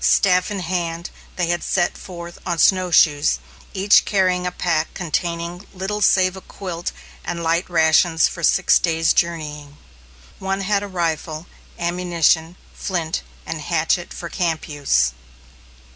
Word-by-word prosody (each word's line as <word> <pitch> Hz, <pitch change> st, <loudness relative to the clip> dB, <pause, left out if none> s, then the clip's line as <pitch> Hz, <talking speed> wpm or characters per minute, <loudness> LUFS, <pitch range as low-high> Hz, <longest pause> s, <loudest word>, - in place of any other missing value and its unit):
Staff 185 Hz, -1 st, +3 dB
in 200 Hz, -2 st, -3 dB
hand, 170 Hz, -1 st, -3 dB, 0.2 s
they 180 Hz, -, 0 dB
had 175 Hz, 0 st, 0 dB
set 175 Hz, -2 st, 0 dB
forth 170 Hz, -2 st, -9 dB
on 175 Hz, -2 st, -2 dB
snowshoes, 160 Hz, -, +4 dB, 0.3 s
each 195 Hz, +2 st, +4 dB
carrying 185 Hz, -2 st, +1 dB
a -, -, -2 dB
pack 165 Hz, -3 st, -1 dB
containing 170 Hz, +2 st, -3 dB
little 195 Hz, +3 st, -3 dB
save 185 Hz, -1 st, +4 dB
a 190 Hz, -, -9 dB
quilt 180 Hz, -3 st, -6 dB, 0.3 s
and 170 Hz, -1 st, -4 dB
light 165 Hz, +2 st, 0 dB
rations 160 Hz, 0 st, +4 dB
for 170 Hz, -, -7 dB
six 160 Hz, -, +4 dB
days' 165 Hz, -1 st, +2 dB
journeying. 150 Hz, -4 st, -2 dB, 0.6 s
One 195 Hz, +1 st, -2 dB
had 200 Hz, +1 st, +1 dB
a 205 Hz, -, -5 dB
rifle, 165 Hz, -3 st, -2 dB, 0.3 s
ammunition, 170 Hz, -1 st, +1 dB, 0.2 s
flint, 170 Hz, -4 st, -2 dB, 0.2 s
and 160 Hz, -, -5 dB
hatchet 170 Hz, +2 st, 0 dB
for 170 Hz, -, -6 dB
camp 165 Hz, -2 st, -2 dB
use. 100 Hz, -, +1 dB
175 Hz, 135 wpm, -21 LUFS, 160-185 Hz, 0.6 s, snowshoes